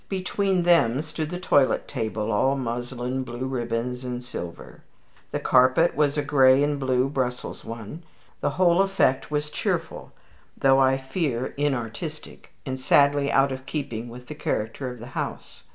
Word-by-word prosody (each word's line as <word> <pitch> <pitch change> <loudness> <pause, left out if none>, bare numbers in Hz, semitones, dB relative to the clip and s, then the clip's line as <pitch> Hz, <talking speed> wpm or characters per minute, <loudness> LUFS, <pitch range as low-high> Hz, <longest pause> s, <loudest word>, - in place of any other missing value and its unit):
Between 190 -1 0
them 150 -6 +3
stood 155 0 -4
the 180 +1 -4
toilet 145 -7 +2
table, 110 -4 -3
all 130 +6 +2
muslin, 125 +1 -3
blue 120 +1 -5
ribbons, 125 -1 -3
and 125 -1 -4
silver. 85 -8 -8 0.5
The - - -2
carpet 130 +6 +4
was 145 0 +2
a 145 - +1
gray 135 -1 +5
and 145 -1 0
blue 130 -1 +1
Brussels 130 -3 -3
one. 115 +7 -8 0.4
The - - 0
whole 180 0 +4
effect 195 -9 +1
was 150 0 -2
cheerful, - - -3 0.5
though 135 0 +4
I 135 0 +4
fear 135 -2 -2
inartistic, 145 +2 -4
and 130 -1 -4
sadly 140 +1 +3
out 135 0 +3
of 130 0 -6
keeping 120 -6 -4
with 125 +1 -10
the 150 - -7
character 125 -2 -3
of 125 - -8
the 120 - -9
house. - - -6
130 Hz, 155 wpm, -25 LUFS, 125-150 Hz, 0.5 s, gray